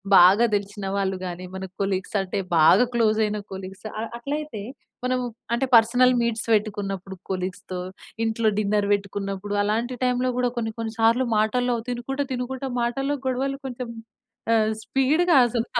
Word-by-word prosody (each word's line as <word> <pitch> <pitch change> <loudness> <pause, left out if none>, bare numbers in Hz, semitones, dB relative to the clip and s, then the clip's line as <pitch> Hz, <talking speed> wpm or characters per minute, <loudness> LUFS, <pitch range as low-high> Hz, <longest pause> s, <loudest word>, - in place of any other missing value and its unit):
బాగా 190 +6 +7
తెలిసిన 200 0 -4
వాళ్ళు 195 -1 0
గాని, 180 0 -5
మన 190 - -5 0.2
కొలీగ్స్ 195 +1 -2
అంటే 190 -1 -4 0.2
బాగా 160 +10 +6
క్లోజ్ 220 -2 +2
అయిన 210 0 -1
కొలీగ్స్, 190 +2 -8
అ - - -2 0.2
అట్లయితే, 285 -2 -4 0.4
మనం 255 0 +1 0.3
అంటే 245 +3 +1
పర్సనల్ 245 +3 +5
మీట్స్ 230 -1 -1
పెట్టుకున్నప్పుడు, 200 -3 -2
కొలీగ్స్‌తో 185 -1 -4 0.5
ఇంట్లో 225 0 0
డిన్నర్ 205 -1 +1
వెట్టుకున్నప్పుడు 200 0 -3
అలాంటి 230 +5 -1
టైమ్‌లో 250 0 +1
కూడా 250 -1 +2
కొన్ని, 225 -2 -2
కొన్ని 225 -1 -3
సార్లు 230 +3 +4
మాటల్లో 245 +3 +1
తినుకుంటా, 270 +3 -2
తినుకుంటా 260 +2 -3
మాటల్లో 270 +4 0
గొడవలు 270 +2 -1
కొంచెం 250 -1 -6 0.6
ఆహ్, 220 -1 +3
స్పీడ్‌గా 280 +9 +3
అసల 235 -1 -1
225 Hz, 140 wpm, -24 LUFS, 200-250 Hz, 0.6 s, బాగా